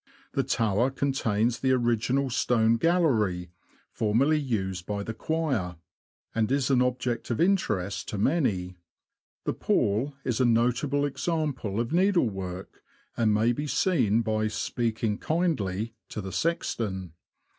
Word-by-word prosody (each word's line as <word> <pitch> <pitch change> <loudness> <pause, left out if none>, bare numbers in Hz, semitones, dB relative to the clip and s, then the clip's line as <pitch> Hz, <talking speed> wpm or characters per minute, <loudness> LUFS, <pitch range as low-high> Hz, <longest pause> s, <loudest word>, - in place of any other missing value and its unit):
The 140 - +2
tower 115 -1 +1
contains 120 -4 0
the 130 -1 +2
original 125 +2 +1
stone 115 -2 +3
gallery, 115 - +1 0.4
formerly 130 +8 +2
used 95 -9 -2
by 100 -1 -2
the 115 - -4
choir, 130 - -1 0.6
and 115 +1 0
is 140 -1 +1
an 125 -2 +4
object 125 -1 -1
of 120 - -1
interest 105 - 0
to 105 - -4
many. 100 - 0 0.7
The - - -1
pall 120 +8 0
is 125 -1 0
a - - +5
notable 125 +5 +2
example 145 - -2
of 120 +5 -2
needlework, 105 - 0 0.3
and 115 -2 +2
may 110 +3 +3
be 145 +5 -3
seen 125 - +2
by 110 0 0
''speaking 110 0 -1
kindly" 115 - -1 0.2
to - - -5
the 95 -2 -5
sexton. 100 - -2
115 Hz, 130 wpm, -27 LUFS, 105-140 Hz, 0.7 s, a